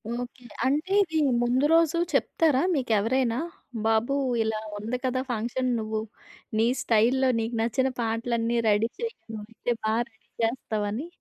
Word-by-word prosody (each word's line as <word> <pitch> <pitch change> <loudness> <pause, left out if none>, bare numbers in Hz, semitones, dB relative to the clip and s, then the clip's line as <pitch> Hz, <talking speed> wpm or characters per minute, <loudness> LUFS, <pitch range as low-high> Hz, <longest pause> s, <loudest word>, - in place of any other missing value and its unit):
Okay. 245 +1 -6 0.2
అంటే 300 +8 0
ఇది 320 -3 -3 0.3
ముందు 250 +3 +2
రోజు 330 0 +4 0.2
చెప్తారా 300 -5 +2
మీకెవరైనా? 235 0 +1 0.5
బాబు 225 +4 +2 0.3
ఇలా 220 -1 -1 0.2
ఉంది 225 +4 -3
కదా! 255 0 0
ఫంక్షన్ 245 +3 -1
నువ్వు 220 0 -2 0.6
నీ 225 - +4
స్టైల్‌లో 255 +2 +3
నీకు 225 +1 -2
నచ్చిన 250 +3 +1
పాటలన్నీ 230 +1 0
రెడీ 210 +2 +3
చెయ్యి 465 0 -3 0.2
నువ్వైతే 225 +3 -3
బాగా 220 +2 +2
రెడీ 220 -1 -34
చేస్తావని. 225 +2 -1
235 Hz, 130 wpm, -27 LUFS, 225-260 Hz, 0.6 s, రోజు